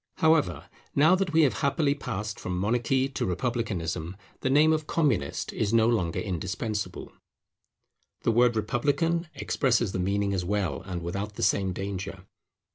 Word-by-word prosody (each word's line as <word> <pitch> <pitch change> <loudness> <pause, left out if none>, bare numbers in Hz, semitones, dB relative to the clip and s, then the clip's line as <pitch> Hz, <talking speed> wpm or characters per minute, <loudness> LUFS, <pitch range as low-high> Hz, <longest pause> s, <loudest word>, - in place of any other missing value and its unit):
However, 155 - +2 0.3
now 155 +5 +6
that 185 -2 +1
we 160 0 +5
have 140 - +1
happily 140 +1 +2
passed 105 -7 -5
from 90 0 -3
monarchy 120 +6 +1
to 135 - -3
republicanism, 95 -5 -2 0.2
the 130 - -1
name 150 +4 +5
of 155 -1 -2
Communist 125 - 0
is 110 +1 0
no 115 0 +5
longer 100 -8 0
indispensable; 95 +1 -3 1.1
the - - +3
word 120 +1 +4
Republican 145 - 0
expresses 120 -6 +1
the 95 - -3
meaning 100 +2 0
as 95 -2 -1
well, 100 0 -1
and 90 -2 -4
without 100 +4 -4
the - - -3
same 95 -2 +2
danger. 95 0 -5
110 Hz, 150 wpm, -27 LUFS, 95-135 Hz, 1.1 s, now